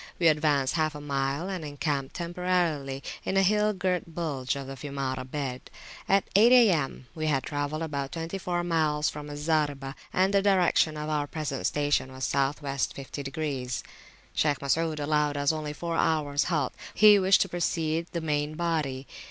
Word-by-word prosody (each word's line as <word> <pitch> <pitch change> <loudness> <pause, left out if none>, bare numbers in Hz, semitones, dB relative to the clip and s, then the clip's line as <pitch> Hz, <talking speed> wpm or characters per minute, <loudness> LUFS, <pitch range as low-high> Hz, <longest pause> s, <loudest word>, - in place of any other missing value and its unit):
We 170 -2 +5
advanced 150 -3 +2
half 155 -2 0
a - - -6
mile, 140 +3 -2
and 185 -4 -4
encamped 145 -2 -3
temporarily 170 -6 -1 0.2
in 195 - -1
a 195 - +5
hill 210 +2 +3
girt 180 -4 -2
bulge 140 -7 -2
of 140 -1 -5
the 135 - -7
Fiumara 135 -2 -3
bed. 130 -3 -4 0.4
At 195 0 +3
eight 225 +4 +7
A.M. 180 - +4
we 155 -1 -3
had 135 -3 +1
travelled 145 +2 -3
about 140 -3 -3
twenty 165 +3 -4
four 175 -2 -1
miles 155 -3 +1
from 150 0 -8
Al 145 - -6
Zaribah, 145 -3 0 0.2
and 190 +2 +2
the 200 - +4
direction 180 -5 +3
of 150 0 -4
our 150 -1 0
present 145 -3 -2
station 145 -2 0
was 130 0 -8
South 140 +2 0
west 140 -1 -1
50°. 135 -2 -4 0.5
Shaykh 145 -2 +2
Masud 155 +2 0
allowed 150 0 +1
us 145 +1 +2
only 155 -1 -4
four 165 +2 -4
hours 145 -2 +1
halt; 160 -5 0 0.2
he 210 0 +8
wished 190 0 +5
to 195 - +1
precede 165 -1 -1
the 170 - -3
main 150 -1 -1
body. 155 -6 -1
150 Hz, 175 wpm, -28 LUFS, 140-170 Hz, 0.5 s, he